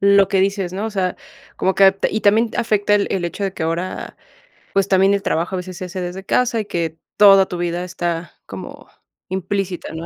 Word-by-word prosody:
lo 200 -1 +5
que 195 -2 +2
dices, 195 -2 0
¿no? 200 +4 -3
O 225 - -4
sea, 185 -3 -1 0.4
como 190 - +1
que 195 - +5
ap 195 0 +3
y 215 - -1
también 220 +3 +3
afecta 205 -2 +2
el 205 - +2
el 180 -3 -1
hecho 175 +4 -4
de 195 - -2
que 165 - -6
ahora, 165 +3 -3 0.6
pues, 195 0 +2
también 195 0 +4
el 200 0 -1
trabajo 175 +2 -1
a - - -2
veces 180 0 -7
se 185 - -5
hace 185 +1 -6
desde 180 +2 -5
casa 240 +1 +1
y 215 - -3
que 165 -4 -3 0.2
toda 195 -2 +7
tu 180 - -5
vida 175 0 -2
está 170 -2 -4
como - - -10 0.4
implícita, 190 0 -3
¿no?, 160 +1 -6
190 Hz, 220 wpm, -20 LUFS, 175-200 Hz, 0.6 s, toda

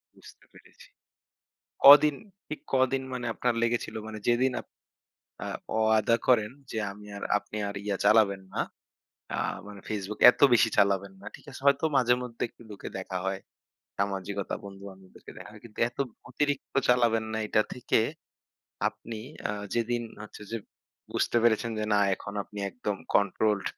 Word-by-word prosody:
বুঝতে - - -17
পেরেছি। - - -18 1.0
কদিন 145 +1 +10 0.3
ঠিক 155 - -5
কদিন 130 0 +2
মানে 125 -1 -4
আপনার 125 +1 0
লেগেছিল 120 0 -1
মানে 110 -1 -6
যেদিন 125 +2 +3
আপ - - -28 0.8
আ - - -4 0.3
ওয়াদা 110 +1 +3
করেন 110 -4 +4 0.2
যে 110 - -3
আমি 105 +1 -13
আর 100 - -8 0.2
আপনি 105 - -10
আর 100 - -6
ইয়া 100 -2 -1
চালাবেন 100 -2 +4
না। - - 0 0.8
আ - - -3 0.3
মানে 105 -1 -10
Facebook 105 0 -4
এত - - -14
বেশি 115 -1 +5
চালাবেন 100 -1 +3
না। 100 - -13
ঠিক - - -13
আছে 130 - -10
হয়তো 140 +2 +4
মাঝে 125 -2 +4
মধ্যে 120 -2 -7
একটু - - -18
ঢুকে 105 - -7
দেখা 95 -1 -4
হয়। 95 0 -2 0.6
সামাজিকতা 100 0 -2
বন্ধু-বান্ধবদেরকে 95 -1 -12
দেখা - - -10
হয়। 105 - -14
কিন্তু 115 -2 -14
এত 120 - -21 0.3
অতিরিক্ত 145 +1 -2
চালাবেন 120 -2 +3
না 110 - -1
এটা 110 - +3
থেকে 125 -2 +1 0.9
আপনি 115 -1 -8 0.3
আ - - 0 0.2
যেদিন 120 0 0 0.2
হচ্ছে 105 0 -11
যে 115 - -2 0.6
বুঝতে - - 0
পেরেছেন 115 0 +3
যে 110 - -1
না 100 - +4
এখন 100 - -9
আপনি 105 - -11
একদম 105 -3 -3 0.2
কন্ট্রোলড 105 0 +2
110 Hz, 155 wpm, -28 LUFS, 100-120 Hz, 1.0 s, কদিন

